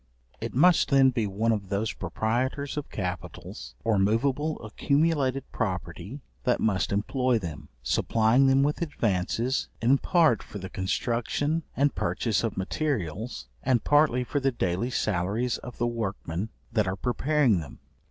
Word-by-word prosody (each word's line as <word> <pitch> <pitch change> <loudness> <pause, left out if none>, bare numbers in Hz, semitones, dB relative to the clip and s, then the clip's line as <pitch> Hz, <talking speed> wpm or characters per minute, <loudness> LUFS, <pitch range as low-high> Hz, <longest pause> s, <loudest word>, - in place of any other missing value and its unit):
It - - -5
must 175 +5 +5
then 135 -1 +5
be 115 -4 0
one 110 +4 0
of 100 -4 -2
those 100 +2 -1
proprietors 130 +6 -2
of 150 -1 -4
capitals, 90 -2 -6
or 110 -3 +2
moveable 135 +9 +1
accumulated 140 +2 +1
property 95 - -4 0.2
that 125 -1 +2
must 95 -5 +1
employ 125 +5 +1
them, 75 -7 -6
supplying 115 - +3
them 135 +1 +4
with 150 +3 0
advances 115 - 0
in 130 +4 +4
part 160 - +3
for - - -9
the 95 -1 -7
construction 120 +10 -1 0.2
and 140 +1 +3
purchase 100 +6 0
of 115 - -2
materials, 100 - -2
and 125 -3 +2
partly 145 -4 +4
for 145 +4 -1
the 135 0 +1
daily 95 0 -1
salaries 105 +2 0
of 125 - -9
the 120 - 0
workmen 105 -4 -3 0.2
that 110 -4 +1
are 95 - -1
preparing 125 - +2
them. 75 -5 -9
115 Hz, 145 wpm, -27 LUFS, 100-135 Hz, 0.2 s, must